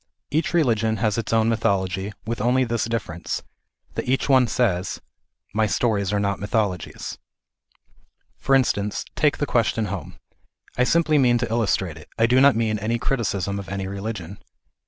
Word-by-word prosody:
Each 155 +3 +1
religion 115 -9 +2
has 110 -1 0
its 115 - -4
own 110 -1 +3
mythology, 100 -3 0
with 115 -1 -3
only 125 +3 +3
this 115 -2 -1
difference, 100 -7 -3 0.5
that - - -4
each 135 +1 +1
one 130 -3 +5
says 100 -5 0 0.3
" - - -43
My 110 +1 +2
stories 105 -3 0
are 105 - +1
not 100 -1 -1
mythologies." 100 -4 -2 1.2
For 135 - +3
instance, 105 -6 +1
take 150 -1 +2
the 145 - 0
question 115 -3 +1
home. 95 - -7 0.6
I 125 - +3
simply 155 0 +3
mean 120 -2 +4
to 120 -2 -2
illustrate 95 -7 0
it; 75 - -14
I 115 - +4
do 125 +2 +4
not 140 0 +6
mean 110 -2 0
any 115 +3 0
criticism 100 -6 -1
of 95 - -8
any 100 0 -3
religion. 100 -1 -5
110 Hz, 165 wpm, -23 LUFS, 100-120 Hz, 1.2 s, not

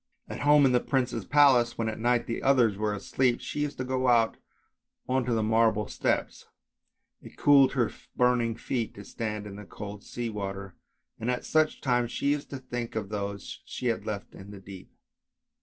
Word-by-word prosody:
At - - -6
home 145 0 +5
in 130 - +4
the 125 - +4
prince's 125 -5 -1
palace, 135 -2 +4
when 115 - -1
at 110 - -4
night 120 +1 +2
the 115 - -4
others 125 -6 +3
were 105 +1 -1
asleep, 125 +4 0
she - - -5
used 145 -1 -2
to 130 - -2
go 130 0 -1
out 115 -2 +4 0.7
on 130 -1 +1
to 120 - 0
the 110 - +1
marble 110 -1 +2
steps; - - -2 0.7
it - - -14
cooled 140 -2 +5
her 125 -4 +1 0.2
burning 125 -2 +2
feet 115 -1 -3
to 100 - -10
stand 105 -2 -4
in 100 -1 -8
the 105 - -8
cold 100 +1 -9
sea 120 -1 -4
water, 100 -2 -5 0.5
and 115 - -2
at 125 0 -2
such 155 -1 +1
times 125 -2 +1
she 140 - 0
used 145 -1 -2
to 140 - -5
think 120 -3 -5
of 105 -3 -3
those 100 -1 -5
she 125 - -3
had 115 - -2
left 100 -2 -5
in 95 +1 -11
the 100 -1 -10
deep. 95 -1 -12
115 Hz, 195 wpm, -28 LUFS, 105-130 Hz, 0.7 s, home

